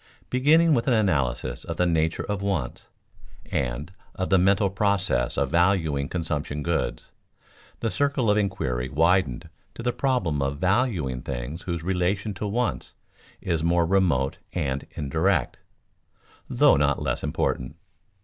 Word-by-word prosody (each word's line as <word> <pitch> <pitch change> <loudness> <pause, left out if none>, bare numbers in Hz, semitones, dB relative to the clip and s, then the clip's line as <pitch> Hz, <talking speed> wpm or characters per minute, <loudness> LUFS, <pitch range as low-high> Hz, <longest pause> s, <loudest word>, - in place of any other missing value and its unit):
Beginning 155 +6 +4
with 120 -2 +1
an 125 - +4
analysis 70 - 0
of - - -5
the 90 - +2
nature 80 -1 +1
of 105 -2 -3
wants, 95 -11 -3 0.6
and 65 +7 -2 0.2
of 95 +1 -3
the 95 - +5
mental 95 +2 +3
process 100 - +1
of - - 0
valuing 85 -5 +2
consumption 75 -4 -3
goods, 85 -1 -2 0.7
the 115 - -1
circle 140 -6 +1
of - - +3
inquiry 65 -12 -1
widened 80 -3 +1 0.3
to 115 - -7
the 120 0 0
problem 120 - 0
of 70 +1 -1
valuing 90 - 0
things 65 +8 -5
whose 85 -2 -4
relation 95 +3 -1
to 100 +2 -4
wants 120 +3 -2 0.5
is 80 -3 -1
more 85 0 +3
remote 80 -8 +1
and 70 -6 -2
indirect 80 +1 0 0.9
(though - - +5
not 70 0 +2
less - - -2
important). 65 +3 -2
85 Hz, 140 wpm, -25 LUFS, 70-100 Hz, 0.9 s, the